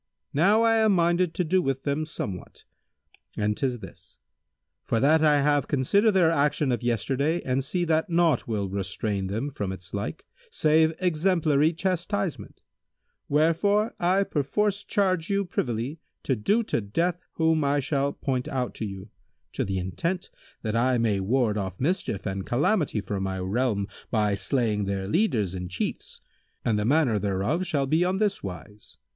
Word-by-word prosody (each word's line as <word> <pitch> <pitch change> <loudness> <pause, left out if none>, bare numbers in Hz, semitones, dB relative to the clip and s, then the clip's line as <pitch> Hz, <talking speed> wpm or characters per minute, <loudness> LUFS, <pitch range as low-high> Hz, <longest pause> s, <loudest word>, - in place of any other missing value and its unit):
Now 200 +10 +4
I 225 0 +4
am 220 -2 +4
minded 175 -1 +2
to 180 - +1
do 185 +3 +2
with 135 -4 -2
them 150 +2 -1
somewhat; 95 - -6 0.7
and 105 0 0
'tis 125 -2 -2
this, 95 0 -13 0.7
for 115 - 0
that 155 +5 +4
I 150 -2 +4
have 145 0 +2
considered 200 - +2
their 175 -4 +4
action 145 -2 +1
of 120 - -1
yesterday 135 - 0
and 130 +1 0
see 175 +6 -1
that 160 0 +1
naught 170 -1 +2
will 105 -4 -1
restrain 95 +1 -2
them 115 +9 -3
from 100 -7 -3
its 95 -2 -8
like 100 -6 -4 0.2
save 160 +1 +3
exemplary 160 -4 +2
chastisement; 185 +1 -3 0.7
wherefore 200 +9 +2
I 185 +3 +3
perforce 200 +7 -1
charge 185 -4 0
you 200 0 +1
privily 125 -2 -3 0.2
to 130 - +1
do 205 - +1
to 120 - -1
death 170 - -1
whom 160 -1 +2
I 140 +1 +2
shall 140 0 0
point 130 -3 -2
out 125 -3 -2
to 110 - -3
you, 95 +1 -9 0.4
to - - -1
the 95 -1 -2
intent 165 - -3 0.3
that 110 -1 -2
I 125 +2 +2
may 110 -4 +1
ward 110 +1 +1
off 95 -2 -5
mischief 145 - -1
and 95 -1 -3
calamity 145 - +1
from 100 -1 -4
my 95 0 -2
realm 100 +2 0 0.2
by 105 -3 +1
slaying 105 0 0
their 95 -1 -2
leaders 110 - +1
and 90 -1 -5
Chiefs; 90 - -4 0.4
and 110 -2 +2
the 105 - -1
manner 130 -5 +3
thereof 100 - -1
shall 145 -5 0
be 155 +5 +2
on 185 +1 0
this 205 -1 0
wise. 100 +3 -9
140 Hz, 165 wpm, -26 LUFS, 105-170 Hz, 0.7 s, Now